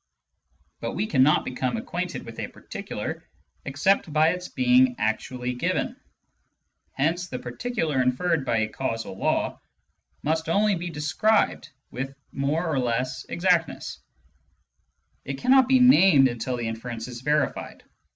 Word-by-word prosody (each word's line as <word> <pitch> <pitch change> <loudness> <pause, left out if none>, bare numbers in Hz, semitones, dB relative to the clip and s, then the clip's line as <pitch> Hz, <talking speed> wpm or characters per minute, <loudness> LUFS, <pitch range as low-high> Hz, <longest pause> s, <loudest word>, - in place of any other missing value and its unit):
But - - -4
we 210 - -1
cannot 150 -5 +3
become 130 0 -2
acquainted - - -4
with - - -9
a - - -3
particular - - -6 0.4
except 155 +5 +1
by 155 +1 +4
its 180 +1 -3
being 125 0 +3
actually 125 +3 -2
given. 125 - -1 1.0
Hence 165 +6 0
the 130 - -5
particular 155 - -2
inferred 145 +5 +1
by 115 -4 +1
a 110 - +1
causal 115 -3 -4
law - - -1 0.6
must 160 +1 0
be 165 - -2
only 200 -3 +1
described 165 +8 +1 0.2
with 135 +2 -5 0.2
more 145 +5 -1
or 150 -4 0
less 125 +1 -1
exactness; 170 -3 0 1.2
it 135 0 -5
cannot 260 - +5
be 265 0 +5
named 195 - +7
until 120 +1 -3
the 120 -1 -3
inference 115 +1 -5
is 120 -1 -8
verified. 150 +2 -1
140 Hz, 130 wpm, -25 LUFS, 125-175 Hz, 1.2 s, named